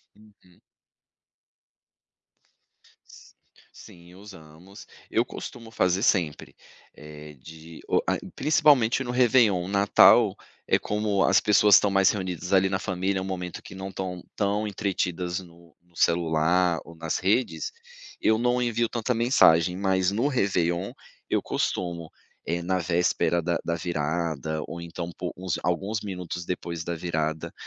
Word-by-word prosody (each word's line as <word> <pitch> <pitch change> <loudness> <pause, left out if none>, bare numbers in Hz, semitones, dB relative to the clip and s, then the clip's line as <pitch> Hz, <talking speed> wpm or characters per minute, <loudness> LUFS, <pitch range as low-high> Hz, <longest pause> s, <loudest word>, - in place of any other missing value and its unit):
Uhum. 105 -4 -23 2.5
S - - -17 0.4
sim, 85 0 -15
usamos, 95 -1 -14 0.2
eu - - +2
costumo 115 -2 -9
fazer 95 -4 +1
sempre, 80 -10 0 0.4
eh, 75 0 -11
de 80 +3 -12
o - - +3
a - - +1 0.2
principalmente 135 -4 +3
no 120 - -4
Réveillon, 115 -7 +3
Natal, 100 +1 +5 0.3
eh, - - +3
como 105 -2 0
as - - +4
pessoas 105 -1 +5
estão 100 0 +4
mais 95 -1 +4
reunidas 95 -2 -3
ali 95 0 +4
na 95 0 -1
família, 95 0 -2
é - - -4
um - - -5
momento 90 -2 -5
que - - -12
não 95 0 -6
estão 90 -2 -5
tão 105 +1 0
entretidas 90 -3 -2
no 85 -2 -16
no 85 -1 -31
celular 85 +1 +2
ou 85 - -13
nas 80 -1 -3
redes, 120 - 0 0.5
eu 110 0 +3
não 125 +1 +1
envio 120 -1 0
tanta 120 +1 -1
mensagem, 90 -8 +4
mas 95 -1 +1
no 115 +7 0
Réveillon 95 - 0 0.4
eu - - +1
costumo, 85 -2 -3 0.4
eh, 85 +1 -2
na 95 +2 -1
véspera 85 0 +1
da 85 0 -1
da 85 - -1
virada, 80 -2 -2
ou 85 - -7
então 85 0 -6
po 90 - -4
uns 90 -2 -3
alguns 95 +5 -1
minutos 90 -3 -6
depois 85 -2 -4
da 85 +1 -4
virada, 80 -2 -3
90 Hz, 140 wpm, -26 LUFS, 85-100 Hz, 2.5 s, Natal